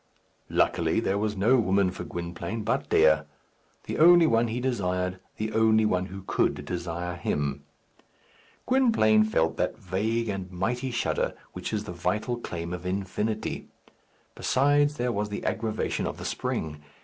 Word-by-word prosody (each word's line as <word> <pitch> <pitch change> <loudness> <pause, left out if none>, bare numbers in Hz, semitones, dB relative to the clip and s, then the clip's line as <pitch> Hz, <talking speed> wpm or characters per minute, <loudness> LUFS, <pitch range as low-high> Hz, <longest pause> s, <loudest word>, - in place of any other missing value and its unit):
Luckily, - - +2
there 100 +1 0
was 105 -1 -1
no 115 +7 +4
woman 100 -4 +2
for - - -6
Gwynplaine 85 +5 -5
but 110 - -1
Dea 80 0 +5 0.6
the - - -4
only 175 +1 +8
one 115 -3 +3
he 115 +2 -2
desired, 90 -7 -1 0.2
the 110 0 -3
only 110 0 +4
one 90 -3 +1
who 95 0 -9
could 75 -5 0
desire 85 +1 -4
him. 70 -4 -2 1.0
Gwynplaine 225 - +4
felt 80 -7 +1
that - - -1
vague 110 +6 -1
and 95 -2 -4
mighty 120 +9 -2
shudder 120 -1 -1 0.2
which 90 -1 -5
is 105 -1 -1
the 90 - -7
vital 105 +7 -1
claim 85 -5 -5
of 90 -1 -5
infinity. 100 +4 -2 0.7
Besides 145 +2 +2
there 125 -3 -1
was 105 -2 -2
the 105 - -5
aggravation 110 -1 -1
of - - -5
the - - -7
spring. 75 -2 -3
105 Hz, 150 wpm, -27 LUFS, 90-115 Hz, 1.0 s, only